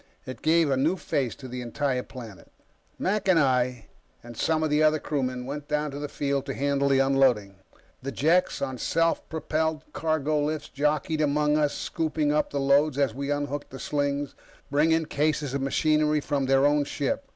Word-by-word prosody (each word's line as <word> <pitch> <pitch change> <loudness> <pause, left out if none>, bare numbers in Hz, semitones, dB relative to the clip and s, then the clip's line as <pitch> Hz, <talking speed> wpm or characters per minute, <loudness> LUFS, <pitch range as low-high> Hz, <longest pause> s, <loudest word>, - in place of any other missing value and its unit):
It 130 -3 -8
gave 160 -2 +3
a 135 - +2
new 160 +8 +1
face 130 - -2
to 130 - -10
the 125 0 -6
entire 130 +1 -1
planet. 115 -7 -11 0.5
Mac 200 +1 -1
and 185 -3 +5
I 125 -5 +1 0.4
and 120 0 -10
some 160 +6 +1
of 155 - 0
the 150 +1 +3
other 155 0 +4
crewmen 130 -5 -3
went 145 +2 -6
down 150 -1 -1
on 145 - -6
the 145 - -4
field 140 -1 -2
to 135 - -3
handle 140 0 +1
the 135 - +4
unloading. 130 -8 +2 0.5
Jeks 150 +8 +1
on 130 -2 -4
self 165 +6 0
propelled 160 -1 -1
cargo 155 -1 0
lifts 150 0 -3
jockeyed 150 +2 0
among 150 0 +2
us, 150 -1 +1
scooping 155 -2 -1
up 150 - +1
the 140 - -2
loads 140 +1 +3
as 140 -5 +1
we 140 +3 -4
unhooked 145 0 -2
the 135 - -9
slings, 145 0 -2 0.4
bringing 160 +3 +3
cases 150 -2 -1
of 140 - -1
machinery 150 +2 +2
from 140 -2 -1
their 135 +1 +4
own 145 0 +3
ship. 145 - -2
145 Hz, 185 wpm, -26 LUFS, 135-155 Hz, 0.5 s, and